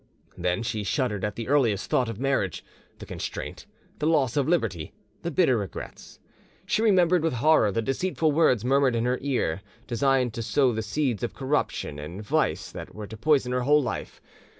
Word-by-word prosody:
Then 90 +4 -1
she 110 -2 -2
shuddered 105 -3 -1
at 105 -1 -2
the 115 - -5
earliest 125 -8 +2
thought 125 -3 +1
of 115 -2 -6
marriage, 135 - -1 0.3
the - - -9
constraint, - - -6 0.3
the 150 - 0
loss 140 -7 +2
of 140 -1 +1
liberty, 110 - -1 0.3
the 170 - -3
bitter 150 -6 +3
regrets; 100 -3 -8 0.5
she 215 - +1
remembered 180 -5 +4
with 165 -2 0
horror 125 -4 +4
the 115 +3 -1
deceitful 160 +4 0
words 130 -7 +3
murmured 135 -1 +3
in 115 +1 0
her 125 +1 0
ear, 125 - -1 0.2
designed 125 0 +1
to 115 - -4
sow 130 +3 +2
the 110 - -2
seeds 120 +1 -1
of 120 - -3
corruption 135 - -2
and 85 +8 -7
vice 150 +5 0
that - - -9
were 105 - -6
to 110 - -9
poison 135 +1 +2
her 125 0 0
whole 145 +3 +4
life. 120 - -5
125 Hz, 185 wpm, -26 LUFS, 110-145 Hz, 0.5 s, remembered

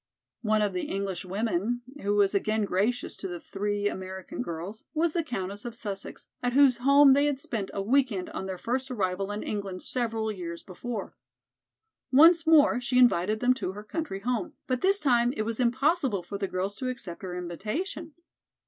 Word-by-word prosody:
One 215 -2 +2
of 205 -2 0
the 180 - -2
English 195 -2 -3
women, 215 +4 -1 0.2
who 205 +1 0
was 200 -1 +3
again 215 +1 +1
gracious 205 +6 0
to 195 - -4
the 175 -1 -6
three 205 +2 -2
American 190 -1 -5
girls, 175 +6 -6
was 320 0 +2
the 340 - 0
Countess 200 -7 -4
of 235 -1 -6
Sussex, 200 -4 -6
at 245 0 0
whose 270 -2 +6
home 280 +2 +6
they 285 +2 +4
had 285 -2 -1
spent 220 -7 -3
a 195 - -3
week 260 +4 +3
end 185 -3 -3
on 190 - -5
their 190 -1 -4
first 255 +6 -2
arrival 195 -4 -1
in 205 - -4
England 200 -3 -4
several 225 -3 -1
years 170 -4 -6
before. 205 +3 -6 1.0
Once 325 +4 +7
more 295 -6 +6
she 250 0 0
invited 215 -4 +4
them 250 +1 +4
to 190 -7 -4
her 210 +1 -8
country 215 -5 -4
home, 245 +1 -2
but 255 -1 -1
this 395 +1 +3
time 245 -5 +3
it 215 - -2
was 225 +1 -3
impossible 260 - +1
for 200 +3 -6
the 195 - -1
girls 185 +2 -2
to 255 - -2
accept 210 -9 -7
her 180 -2 -5
invitation. 280 - -4
215 Hz, 190 wpm, -28 LUFS, 195-255 Hz, 1.0 s, Once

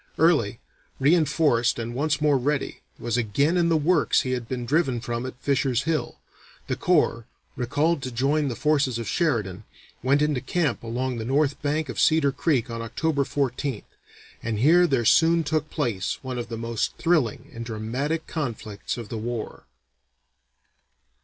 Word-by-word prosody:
Early, 135 -10 +3 0.4
reinforced 150 -4 +3
and 115 0 -4
once 150 +5 0
more 150 -3 +3
ready, 140 +2 -2 0.2
was 120 0 -2
again 140 - +1
in 170 -1 +2
the 165 - +3
works 155 +1 +3
he 130 - -3
had 125 -2 -3
been 125 -2 -3
driven 135 -3 +1
from 120 +1 -4
at 130 - -9
Fisher's 135 -2 +1
Hill. 160 0 -2 0.5
The - - -2
corps, 145 -9 +1 0.3
recalled 145 +6 0
to 130 - -4
join 140 +5 +1
the 125 - -3
forces 140 -2 +1
of 115 - -5
Sheridan, 110 - -1 0.4
went 140 +4 +3
into 150 -4 0
camp 160 +3 -1
along 125 +2 -3
the 110 - -3
north 140 +4 +1
bank 150 +1 -1
of 125 - -5
Cedar 155 -3 +4
Creek 135 -4 0
on 115 0 -5
October 140 +5 0
14th, 135 -2 -2 0.6
and 115 -2 -2
here 170 +9 +5
there 130 -6 +1
soon 165 +6 +4
took 155 0 -1
place 115 - -2
one 130 -2 -4
of 120 -1 -5
the 115 - -4
most 115 -1 -2
thrilling 155 -4 0
and 115 -1 -6
dramatic 125 +8 -3
conflicts 115 -10 -4
of 115 -3 -7
the 115 - -4
war. 115 0 -5
135 Hz, 165 wpm, -25 LUFS, 115-155 Hz, 0.6 s, here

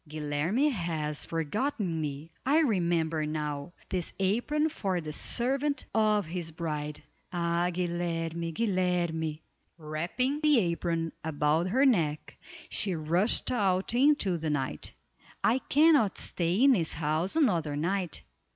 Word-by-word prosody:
"Guilerme 155 - 0
has 160 - -2
forgotten 170 - -2
me! 150 +2 -5
I 290 +5 +4
remember 170 - +1
now: 150 0 -4 0.2
this 180 -3 -2
apron 245 +11 +1
for 195 - -2
the 155 -2 -6
servant 275 - 0
of 215 -2 +3
his 170 0 -4
bride. 150 -2 -4 0.3
Ah! 170 0 0
Guilerme! 170 -1 -2
Guilerme!" 175 -5 0 0.4
Wrapping 170 - -2
the 300 -3 +5
apron 170 -4 0
about 155 +2 +1
her 260 +8 +3
neck, 160 - +1 0.3
she 195 -4 0
rushed 170 +8 +2
out 195 -4 +1
into 245 - +3
the 160 0 -2
night. 135 - -2 0.5
"I 245 +4 +3
cannot 290 - +4
stay 175 +7 0
in 275 - +7
this 175 -10 +2
house 155 +4 -1
another 170 - +2
night. 175 +3 -2
175 Hz, 125 wpm, -29 LUFS, 155-215 Hz, 0.5 s, in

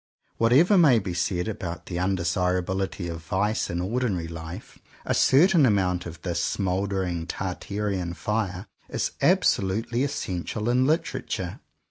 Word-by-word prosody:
Whatever 150 - +5
may 145 -8 +6
be 95 -4 -2
said 90 +2 -1
about 90 -5 -5
the 85 - -5
undesirabiHty 90 +1 -1
of 85 -1 -5
vice 105 +6 0
in 85 - -2
ordinary 95 -3 -1
Hfe, 85 +4 -8 0.3
a - - +1
certain 170 +3 +5
amount 90 -7 +2
of 85 -1 -9
this 85 -2 -1
smouldering 95 -3 -1
Tartarean 95 -1 -3
fire 100 +1 -2 0.2
is - - -1
absolutely 110 +6 +2
essential 110 -5 -3
in 130 +2 +3
Literature. 160 +4 -2
95 Hz, 125 wpm, -26 LUFS, 90-115 Hz, 0.3 s, may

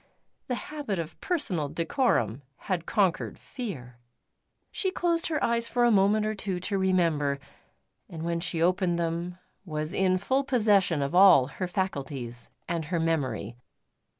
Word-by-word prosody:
The 250 - -1
habit 280 -6 -4
of 165 -1 -6
personal 185 - -1
decorum 155 - 0 0.2
had 180 -4 -3
conquered 190 -5 +1
fear. 150 - -7 0.7
She 380 - -1
closed 345 -2 0
her 305 -3 -1
eyes 235 0 +1
for 245 - +1
a 240 - +5
moment 210 +1 +3
or 215 - 0
two 195 -3 -3
to 195 +2 -2
remember, 165 -7 +2 0.7
and 160 -1 -7
when 170 0 -1
she 165 -1 -1
opened 180 0 +2
them 170 +1 -2 0.3
was 155 -2 -4
in 185 -1 +2
full 260 +9 +1
possession 205 - +3
of 140 - -3
all 180 -8 +7
her 185 +6 -4
faculties 140 - -4 0.2
and 170 -2 -2
her 170 +2 -1
memory. 130 -9 -1
180 Hz, 150 wpm, -28 LUFS, 155-210 Hz, 0.7 s, all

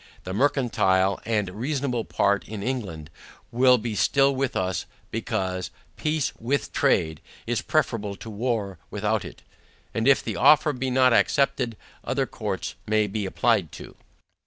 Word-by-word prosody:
The 95 - -5
mercantile 100 -7 +2
and 105 -3 0
reasonable 125 +2 -2
part 100 0 +1
in 105 -2 -6
England, 95 - -4 0.4
will 125 +1 +5
be 115 -1 -4
still 135 +6 +3
with 135 -1 -1
us; 95 -2 -1 0.2
because, 90 -1 -2 0.3
peace 155 -2 -1
WITH 135 +5 -1
trade, 80 -1 +1 0.2
is 120 0 -1
preferable 115 -11 0
to 110 - -9
war 105 -5 -2
WITHOUT 105 +1 -1
it. - - -11 0.5
And 115 +2 0
if 140 - +5
this - - -3
offer 150 0 +5
be 130 0 -2
not 130 -1 +4
accepted, 125 -5 +2 0.3
other - - 0
courts - - -4
may 110 0 +3
be 105 0 -3
applied - - +1
to. - - -10
115 Hz, 145 wpm, -25 LUFS, 100-130 Hz, 0.5 s, will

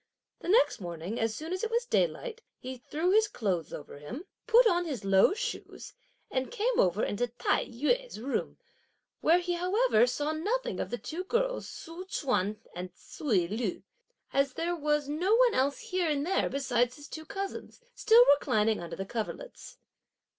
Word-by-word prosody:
The - - -6
next 445 - +4
morning, 175 +4 -5
as 225 -1 0
soon 320 +3 -5
as 370 - -3
it 450 - 0
was 470 +1 0
daylight, 485 -2 0 0.2
he 260 +1 -7
threw 320 +8 -1
his 435 +2 +5
clothes 190 - -2
over 145 -1 -8
him, 240 - -7 0.2
put 470 +2 +6
on 355 -4 +3
his 265 -11 -4
low 195 - +5
shoes 485 +2 -5 0.4
and 260 0 -1
came 485 +1 0
over 185 +3 +3
into 245 +4 0
Tai 240 +1 0
yü's 480 - -1
room, 265 +5 -3 0.6
where 335 +2 +5
he 355 0 -1
however 365 - +3
saw 290 +5 -1
nothing 415 +11 -2
of - - -2
the 240 - -3
two 330 +8 -5
girls - - 0
Tzu 335 +3 -8
Chüan 245 - -1 0.2
and 180 +1 -5
Ts'ui 205 - -1
Lu, 215 0 -3 0.5
as 275 -1 +2
there 340 +4 -1
was 295 -2 0
no 350 +9 +2
one - - +5
else 275 +2 +1
here 365 -3 -1
in 290 -2 0
there 370 +5 +1
besides 250 -3 0
his 290 0 -11
two 315 - -7
cousins, 395 +1 -6
still 475 0 +6
reclining 220 - +3
under 170 - -6
the 195 - -4
coverlets. 235 - -6
300 Hz, 175 wpm, -30 LUFS, -, 0.6 s, put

